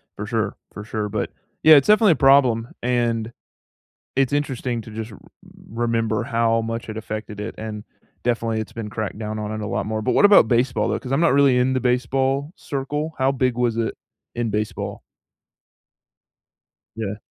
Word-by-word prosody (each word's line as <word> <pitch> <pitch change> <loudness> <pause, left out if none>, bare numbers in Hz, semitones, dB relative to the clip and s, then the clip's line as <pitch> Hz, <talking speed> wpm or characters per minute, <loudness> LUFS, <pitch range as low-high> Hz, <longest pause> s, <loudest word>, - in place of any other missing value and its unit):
For - - -5
sure. - - -2 0.2
For 105 - -7
sure, 105 -1 -3
but, - - -3 0.3
yeah, 155 0 +9
it's 140 - +4
definitely 210 -3 +6
a - - -3
problem, 130 -4 +4
and 115 -2 0 0.8
it's 135 +1 +2
interesting 130 -4 -1
to 110 - -11
just 110 +1 -6
r 105 - -11
r - - -19 0.6
remember 115 -2 0
how 115 0 +1
much 115 0 -4
it 110 - -5
affected 110 -1 -6
it 105 +2 -5
and, 110 -1 -6 0.4
definitely, 115 -2 0
it's 110 - -8
been 115 -2 -5
cracked 110 -1 -4
down 110 -1 -4
on 105 0 -4
it 110 - -4
a 105 - -3
lot - - -2
more, 110 +1 -2
but - - 0
what - - +3
about 200 - +7
baseball, 120 +2 +1
though? - - 0
'Cause 130 - -8
I'm 135 - +2
not 170 -3 +4
really 140 -2 +5
in 125 +1 +2
the 130 - +1
baseball 130 +3 0
circle. 150 +3 -4
How 130 +1 +2
big 130 -2 0
was 120 -2 +1
it 115 -1 -2 0.4
in 120 -1 -1
baseball? 105 0 -3 1.9
Yeah. 105 -2 -4
115 Hz, 185 wpm, -22 LUFS, 110-135 Hz, 1.9 s, yeah